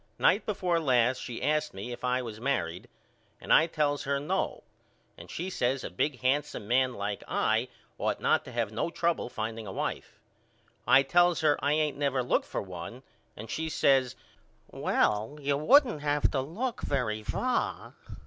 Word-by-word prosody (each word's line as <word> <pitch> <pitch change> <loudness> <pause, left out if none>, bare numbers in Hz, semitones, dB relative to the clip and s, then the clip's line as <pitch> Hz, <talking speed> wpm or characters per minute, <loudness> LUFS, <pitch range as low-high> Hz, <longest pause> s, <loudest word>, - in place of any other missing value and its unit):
Night 210 - +3
before 185 -5 0
last 130 -4 +2
she 120 -1 -6
asked 150 -1 0
me 100 +6 -6
if 120 - -8
I 125 0 +1
was 110 -2 -8
married 120 -10 -2 0.5
and - - +1
I 160 - +6
tells 145 -3 0
her 140 0 0
No 145 - -2 0.5
and - - -13
she 175 - -4
says 130 -3 0
a - - -5
big 125 +8 -1
handsome 130 -5 0
man 130 +1 +2
like 100 0 -4
I 110 +3 +1 0.3
ought - - -1
not - - +2
to - - -9
have 115 -3 -1
no 110 +9 -2
trouble 170 -5 -1
finding 110 -1 -5
a - - -5
wife. - - -4 0.7
I 135 - +7
tells 175 +5 +3
her 150 -2 +4
I 145 +1 +3
ain't 150 -2 0
never 135 -3 +1
looked 125 - 0
for - - -3
one - - -8 0.3
and 110 - -8
she 160 +7 -3
says 135 -4 +2 0.6
Well 110 +7 0
you 140 0 0
wouldn't 235 - +4
have 145 0 +1
to 135 - 0
look 215 - -4
very 110 -6 -1
far. 250 - -2
135 Hz, 175 wpm, -29 LUFS, 120-155 Hz, 0.7 s, I